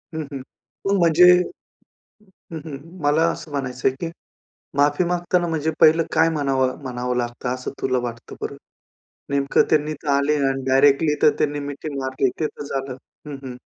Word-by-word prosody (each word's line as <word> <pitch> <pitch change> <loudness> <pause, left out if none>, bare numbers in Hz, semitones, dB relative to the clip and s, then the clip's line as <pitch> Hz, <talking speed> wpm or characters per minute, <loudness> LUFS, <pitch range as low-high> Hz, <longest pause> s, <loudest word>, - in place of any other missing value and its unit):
हं, 160 - -2
हं. 135 -2 -5 0.5
मग 200 0 +3
म्हणजे 170 0 +5 1.3
हं, 160 - -4
हं, 145 -4 -6 0.3
मला 155 +3 +3
असं 155 - -9
म्हणायचंय, 130 -2 -1
की 165 - -2 0.7
माफी 145 +4 +3
मागताना 175 0 0
म्हणजे 160 -1 -1
पहिलं 160 +1 +6
काय 165 +1 +4
म्हणावं 135 -4 0
म्हणावं 125 -1 -3
लागतं, 120 +1 -3
असं 130 - -6
तुला 130 -1 +1
वाटतं 115 0 -9
बरं? - - -5 0.7
नेमकं 140 0 +3
त्यांनी 150 0 +2
इथं 155 0 -7
आले 140 +2 +2
आणि 135 0 -2
डायरेक्टली 145 +3 +4
तर - - +7
त्यांनी 145 0 0
मिठी 145 +1 -6
मारली, 130 0 0
ते 155 - +2
तर 145 - -8
झालं. 135 -2 -4 0.3
हं, 145 - -5
हं. 125 -2 -7
145 Hz, 160 wpm, -22 LUFS, 130-160 Hz, 1.3 s, तर